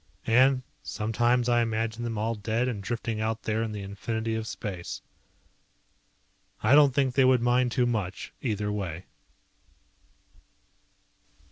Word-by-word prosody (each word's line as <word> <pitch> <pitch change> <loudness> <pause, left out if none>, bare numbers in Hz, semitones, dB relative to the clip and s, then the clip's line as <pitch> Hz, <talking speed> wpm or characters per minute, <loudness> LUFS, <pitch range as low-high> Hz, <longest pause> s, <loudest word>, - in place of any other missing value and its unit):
And 130 +3 +4 0.2
sometimes 120 +3 +1
I 120 -1 +4
imagine 115 0 -1
them 115 -2 -3
all 110 +2 0
dead 115 +3 -1
and 110 -5 -3
drifting 115 +1 -3
out 110 0 -2
there 110 0 0
in 115 -1 -2
the 105 -1 -5
infinity 110 +3 -3
of 110 0 -3
space. 95 -6 -6 1.6
I 110 +5 +4
don't 145 -3 +6
think 135 -3 +2
they 135 - +4
would 130 -2 +4
mind 125 0 +3
too 125 0 +2
much, 105 -6 -3
either 105 -4 -1
way. 95 -4 -4
115 Hz, 135 wpm, -27 LUFS, 105-120 Hz, 1.6 s, don't